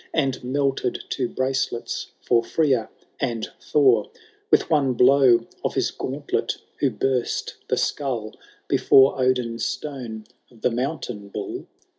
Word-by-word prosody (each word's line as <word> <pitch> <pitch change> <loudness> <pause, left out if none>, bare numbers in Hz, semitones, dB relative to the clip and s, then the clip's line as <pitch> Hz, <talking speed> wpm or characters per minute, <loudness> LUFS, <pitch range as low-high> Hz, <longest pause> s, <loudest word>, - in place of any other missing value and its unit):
And 135 -5 0
melted 135 -1 -1
to 125 -3 -1
bracelets 130 -2 -2
for 115 -1 +2
Freya 130 -4 +1 0.3
and 120 -5 -2
Thor; 130 -8 +3 0.4
With - - +4
one 145 -5 +2
blow 125 0 +5 0.2
of - - -1
his - - +1
gauntlet 145 +2 -2 0.2
who 140 - +3
burst 125 +2 -1
the - - 0
skull. 120 -7 -2 0.3
Before 135 0 +5
Odin's 125 -2 +1
stone, 125 -7 -4 0.3
of 115 -3 -20
the 125 - +2
Mountain 125 -5 -3
Bull - - -6
130 Hz, 125 wpm, -24 LUFS, 120-135 Hz, 0.4 s, blow